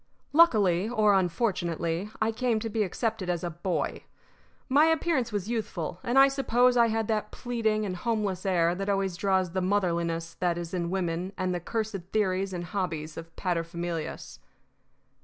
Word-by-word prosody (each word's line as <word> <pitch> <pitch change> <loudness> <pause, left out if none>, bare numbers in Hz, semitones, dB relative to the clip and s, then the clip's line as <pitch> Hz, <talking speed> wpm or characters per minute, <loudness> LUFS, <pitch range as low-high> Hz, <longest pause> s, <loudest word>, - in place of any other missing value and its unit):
Luckily 210 - +4
or 215 -4 +3
unfortunately, 175 -2 0
I 220 0 +2
came 230 0 0
to 225 - -3
be 220 - 0
accepted 215 -1 -2
as 175 -1 -1
a 175 - -2
Boy. 175 +3 -2 0.6
My 290 +3 +5
appearance 320 -7 +1
was 205 -2 -2
youthful, 200 -8 -3
and 240 +3 0
I 270 0 +9
suppose 250 -2 +2
I 235 -1 +5
had 225 -1 -1
that 215 -1 0
pleading 220 -3 -1
and 185 -2 -3
homeless 205 -2 -1
air 175 -3 +2
that 195 +3 -3
always 195 -2 0
draws 190 -1 +1
the 185 +1 -1
motherliness 170 -4 0
that 175 -1 +1
is 175 0 -6
in 170 -2 -1
women 180 0 -2
and 185 -1 -1
the 175 - -1
cursed 220 +3 -3
theories 195 -2 +1
and 175 -1 -4
hobbies 165 -4 -3
of 165 0 -8
paterfamilias. 170 -2 -3
195 Hz, 165 wpm, -28 LUFS, 175-225 Hz, 0.6 s, I